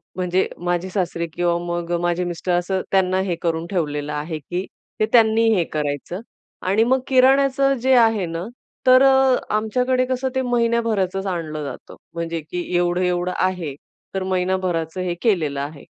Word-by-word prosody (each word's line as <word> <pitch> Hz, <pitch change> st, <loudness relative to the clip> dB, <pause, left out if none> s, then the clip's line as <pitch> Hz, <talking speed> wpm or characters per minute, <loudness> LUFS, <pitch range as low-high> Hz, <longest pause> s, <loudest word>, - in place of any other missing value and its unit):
म्हणजे 185 Hz, +1 st, 0 dB, 0.2 s
माझे 175 Hz, +1 st, -1 dB
सासरे 180 Hz, -3 st, -2 dB
किंवा 175 Hz, -1 st, +1 dB
मग 175 Hz, 0 st, -3 dB
माझे 175 Hz, +1 st, 0 dB
मिस्टर, 175 Hz, +1 st, -3 dB
असं 180 Hz, +2 st, 0 dB
त्यांना 190 Hz, -1 st, +2 dB
हे 185 Hz, -3 st, -1 dB
करून 165 Hz, -1 st, -1 dB
ठेवलेलं 150 Hz, -4 st, -2 dB
आहे, 155 Hz, +2 st, -4 dB
की 175 Hz, +6 st, -4 dB, 0.3 s
ते 215 Hz, -, +3 dB
त्यांनी 225 Hz, -1 st, +5 dB
हे 180 Hz, -, +2 dB
करायचं. 150 Hz, +5 st, -3 dB, 0.4 s
आणि 200 Hz, +4 st, +2 dB
मग 260 Hz, +2 st, +2 dB
किराण्याचं 275 Hz, +1 st, +4 dB
जे 265 Hz, -, +4 dB
आहे 225 Hz, -5 st, +4 dB
ना, 165 Hz, 0 st, -4 dB, 0.4 s
तर 255 Hz, +1 st, +7 dB
अ, 265 Hz, -1 st, +5 dB, 0.2 s
आमच्याकडे 250 Hz, +4 st, +1 dB
कसं 260 Hz, +1 st, -1 dB
ते 260 Hz, -, +2 dB
महिन्याभराचंच 230 Hz, -6 st, 0 dB
आणलं 160 Hz, -4 st, -3 dB
जातं. 140 Hz, -3 st, -8 dB, 0.2 s
म्हणजे, 170 Hz, -1 st, -3 dB
की 175 Hz, +3 st, -5 dB
एवढं, 175 Hz, +1 st, +1 dB
एवढं 180 Hz, 0 st, 0 dB
आहे, 180 Hz, -6 st, -1 dB, 0.4 s
तर 190 Hz, -1 st, -2 dB
महिनाभराचं 185 Hz, -2 st, -1 dB
हे 180 Hz, -1 st, -1 dB
केलेलं 155 Hz, -11 st, +1 dB
आहे. 145 Hz, 0 st, -6 dB
185 Hz, 160 wpm, -21 LUFS, 170-225 Hz, 0.4 s, तर